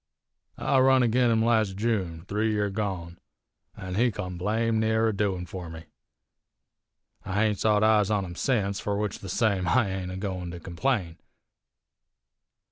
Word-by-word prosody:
I 135 - +2
run 130 0 +5
agin 120 +1 +3
him 110 -1 +2
las' 110 -4 +2
June, 95 -7 -2
three 105 +2 0
year 105 -1 0
gone, 95 -5 -4 0.6
an' 95 0 -6
he 120 +6 +3
come 90 -4 -5
blame 110 +5 0
near 110 0 +2
a - - -1
doin' 95 -3 -1
fur 90 -1 -7
me. 80 0 -9 1.4
I 95 - -5
haint 105 -2 0
sot 105 -1 +3
eyes 110 -2 +4
on 105 -2 0
him 85 - -7
sence, 100 -2 0
fur 100 0 -2
which 105 -2 -2
the 95 - -8
same 100 -5 +1
I 110 +1 +2
ain't 95 -1 -4
a 95 - -5
goin' 95 -3 -4
to 85 0 -7
complain. 85 0 -2
105 Hz, 165 wpm, -27 LUFS, 90-110 Hz, 1.4 s, run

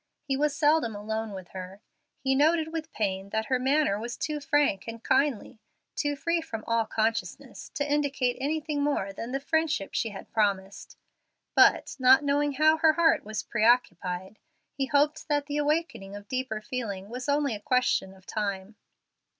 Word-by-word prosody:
He 275 -2 -1
was 290 +1 +1
seldom 295 -7 +2
alone 220 +1 -3
with 190 -2 -8
her; 185 +1 -8 0.4
he 265 0 0
noted 315 +3 +2
with 320 -1 -4
pain 195 -2 -2
that 220 +1 -1
her 260 -2 0
manner 265 -5 +2
was 235 +2 -5
too 300 0 -2
frank 285 -8 +1
and 230 0 -7
kindly, 265 -5 +1 0.4
too 290 -1 0
free 335 +3 0
from 225 -9 -6
all 230 -1 +1
consciousness, 225 +1 -2
to 285 - -1
indicate 285 -4 0
anything 300 +1 -1
more 280 -9 0
than 230 +5 -6
the 270 - -1
friendship 305 -7 0
she 225 - 0
had 200 -2 -10
promised; 200 -3 -1 0.6
but, - - +4
not 260 +2 +6
knowing 285 0 +1
how 310 +3 +4
her 315 0 +5
heart 325 -1 +3
was 215 0 -4
preoccupied, 200 -5 +1 0.3
he 270 -1 -2
hoped 290 +2 +1
that 290 -2 +1
the 290 0 -3
awakening 290 -10 -1
of 205 0 -10
deeper 255 -3 -3
feeling 215 -7 -5
was 250 +3 -5
only 285 -3 +1
a 210 - -5
question 250 -6 +1
of 190 -1 -20
time. 200 -1 -4
255 Hz, 170 wpm, -28 LUFS, 210-295 Hz, 0.6 s, not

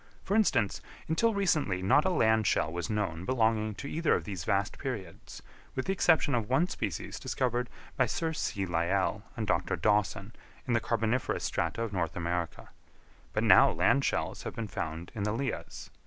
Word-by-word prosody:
For 195 - -2
instance, 130 - +2 0.3
until 215 +8 +2
recently 150 - +1
not 145 - +4
a - - +3
land 110 - +3
shell 80 - +1
was 90 +5 -3
known 95 -6 -2
belonging 110 -2 +1
to 140 - -6
either 160 +2 +1
of - - -2
these 95 -7 -5
vast 100 0 0
periods, 110 - -6 0.3
with 130 - -2
the - - 0
exception 160 -5 +3
of 115 -3 0
one 160 +8 +3
species 105 - -4
discovered 125 -1 -1 0.3
by 130 - +3
Sir 160 +7 -1
C. 100 -9 -2
Lyell 95 +4 0 0.2
and 110 - -1
Dr. 105 - 0
Dawson 105 +3 0 0.3
in 125 - 0
the 115 - +4
carboniferous 115 +2 -1
strata 115 - -1
of 110 -3 -4
North 85 -4 -1
America; 85 -2 -3 0.6
but - - 0
now - - +7
land - - +2
shells - - -1
have - - -6
been 115 -2 -3
found 85 -2 -5
in 110 - -5
the 105 +1 0
lias. 130 +1 -4
110 Hz, 180 wpm, -30 LUFS, 95-130 Hz, 0.6 s, now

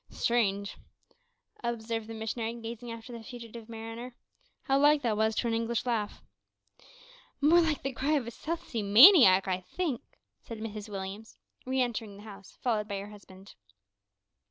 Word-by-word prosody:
"Strange," 200 -4 0 0.9
observed 230 -1 -3
the 225 - -7
missionary, 225 +1 -3
gazing 235 +1 -7
after 230 +1 -9
the 230 - -7
fugitive 230 -1 -10
mariner, 230 +2 -7 0.5
"how 270 0 +2
like 295 0 +4
that 225 -3 +1
was 220 +1 +1
to 235 - 0
an 230 - 0
English 230 +1 -1
laugh!" 225 -4 -2 1.2
"More 320 +4 +5
like 315 -4 0
the 270 0 -2
cry 275 +5 0
of 280 -5 +1
a 235 - -6
South 330 +7 -5
Sea 230 - -3
maniac, 205 - +8
I 185 -1 0
think," 290 - -3 0.4
said 230 - -8
Mrs 215 -1 -6
Williams, 195 +2 -7 0.3
re 260 0 0
entering 225 -4 -4
the 205 - -12
house, 200 -3 -13
followed 215 -4 0
by 200 -2 -3
her 200 +1 -7
husband. 195 -1 -14
225 Hz, 160 wpm, -29 LUFS, 210-245 Hz, 1.2 s, maniac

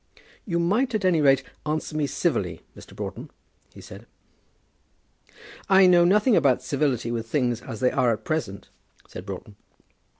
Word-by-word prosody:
"You 170 -3 -1
might, 215 +9 +1
at 205 -3 -1
any 170 -4 +3
rate, 135 -2 +4 0.2
answer 155 0 -3
me 150 -2 0
civilly, 95 - -2
Mr. - - -14
Broughton," - - -7 0.4
he - - -14
said. - - -12 1.6
"I 190 -1 +6
know 175 -1 +5
nothing 210 +6 +3
about 130 -7 +2
civility 135 -5 -1
with 115 -1 -4
things 120 -2 -1
as 115 -4 -8
they 125 - +3
are 120 - +2
at 110 - -4
present," 115 -12 -4 0.4
said 90 +2 -10
Broughton. 100 +1 -8
145 Hz, 155 wpm, -24 LUFS, 115-175 Hz, 1.6 s, I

